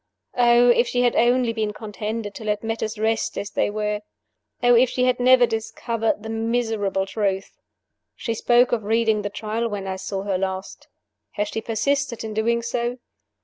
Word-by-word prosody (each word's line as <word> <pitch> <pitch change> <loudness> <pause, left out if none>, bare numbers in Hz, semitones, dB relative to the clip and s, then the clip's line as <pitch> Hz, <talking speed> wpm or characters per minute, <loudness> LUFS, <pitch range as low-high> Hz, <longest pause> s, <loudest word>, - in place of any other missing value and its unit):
Oh, 240 0 +5
if 240 0 +4
she 245 +1 +1
had 245 - +2
only 240 0 +3
been 215 -2 -2
contented 210 0 -5
to 220 - -9
let 210 0 -1
matters 225 0 -3
rest 220 +1 0
as 200 - -4
they - - 0
were! 210 0 -2 0.6
Oh, 245 0 +6
if 245 +1 +5
she 250 - -1
had 250 -1 +2
never 250 0 +6
discovered 225 -1 -2
the 220 - -6
miserable 225 -4 -1
truth! 195 -1 -2 0.6
"She 230 - -3
spoke 240 +2 +3
of 235 -3 0
reading 220 0 +2
the 205 - -3
Trial 220 +3 -3
when 205 -2 -4
I 190 -1 -3
saw 190 +1 -4
her 195 -2 -1
last. 190 0 -4 0.5
Has 205 0 -2
she 225 - -3
persisted 270 +2 -1
in 220 -1 -5
doing 230 +2 +1
so? 240 +1 -2
225 Hz, 180 wpm, -23 LUFS, 210-240 Hz, 0.6 s, Oh